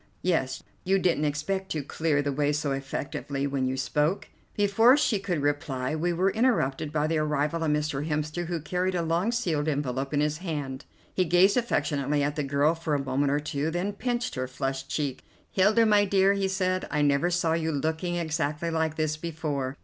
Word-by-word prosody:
"Yes, 135 -7 0 0.2
you 190 +1 +3
didn't 175 -5 +1
expect 190 +7 -2
to 155 -2 -2
clear 145 0 0
the 145 - -1
way 145 +1 +1
so 145 -1 -1
effectively 135 +1 -3
when 135 -2 0
you 130 +1 -2
spoke?" 150 +7 0 0.3
Before 225 +6 +5
she 235 -8 +2
could 180 -7 -2
reply 145 -2 -1
we 170 +3 0
were 185 +3 +2
interrupted 155 - +1
by 150 -1 +1
the 160 0 +1
arrival 150 +2 0
of 160 - +1
Mr. 150 -1 -1
Hemster, 155 +3 -2
who 170 -1 -2
carried 180 +4 -1
a 170 - 0
long 170 +7 +1
sealed 165 -11 -1
envelope 135 -2 -1
in 145 - +1
his 150 +1 0
hand. 145 -6 -4 0.3
He 185 - +2
gazed 180 +3 +4
affectionately 145 - 0
at 145 +1 -1
the 150 - -1
girl 140 +3 +2
for 165 -2 -2
a 140 -1 -2
moment 135 +1 +1
or 145 - +2
two, 150 +1 -2
then 175 +5 -2
pinched 245 +3 -2
her 130 -1 -3
flushed 135 +1 -4
cheek. 140 -4 -2 0.3
"Hilda, 210 +4 +4
my 210 -1 +4
dear," 195 0 +4
he 200 -1 0
said, 185 -1 -1
"I 150 -1 +1
never 145 +4 +3
saw 175 -2 +1
you 160 -1 0
looking 160 +4 -1
exactly 160 -1 -1
like 160 -1 0
this 155 -1 -1
before. 150 -5 -3
155 Hz, 195 wpm, -27 LUFS, 145-180 Hz, 0.3 s, Before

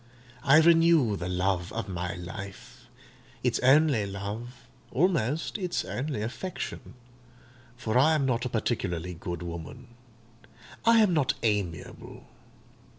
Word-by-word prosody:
I 140 +3 +6
renew 165 -7 +5
the 90 -2 -4
love 90 -1 -1
of 115 -3 -3
my 90 0 -4
life—its 120 +6 -7
only 135 -5 +4
love—almost 120 - -2
its 180 -2 -2
only 130 -4 -3
affection; 130 +3 -6 0.8
for 115 -2 -3
I 155 +4 +5
am 145 -3 +1
not 120 -2 0
a 125 - -2
particularly 90 -7 -2
good 85 0 -6
woman: 85 +9 -8 1.0
I 230 -1 +6
am 190 -4 +2
not 150 -6 +2
amiable. 100 -8 -3
120 Hz, 110 wpm, -28 LUFS, 95-140 Hz, 1.0 s, I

